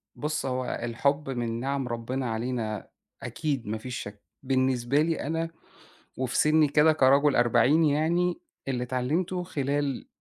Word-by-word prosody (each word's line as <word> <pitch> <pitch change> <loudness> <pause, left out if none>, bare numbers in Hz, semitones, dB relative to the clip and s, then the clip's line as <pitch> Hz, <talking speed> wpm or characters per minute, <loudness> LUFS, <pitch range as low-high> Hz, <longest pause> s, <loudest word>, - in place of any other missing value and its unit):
بُص، 150 -1 -2
هو 130 -1 -2
الحُب 140 +5 0
من 120 -2 -2
نِعَم 135 0 -2
ربِّنا 120 +2 -3
علينا 110 -3 -3 0.3
أكيد 140 -8 -3
ما 110 +1 -2
فيش 125 +2 -6
شَك، 105 0 -8 0.2
بالنسبة 130 0 +1
لي 160 +1 0
أنا 165 +1 -1 0.7
وفي 130 -1 -2
سِنّي 155 0 +4
كده 150 +2 +5
كرَجُل 140 0 +4
أربعيني 145 +6 +4
يعني 170 +4 +1 0.3
اللي 125 -2 -1
اتعلمتُه 155 +9 -1
خلال 145 -4 -2
135 Hz, 135 wpm, -27 LUFS, 125-150 Hz, 0.7 s, كده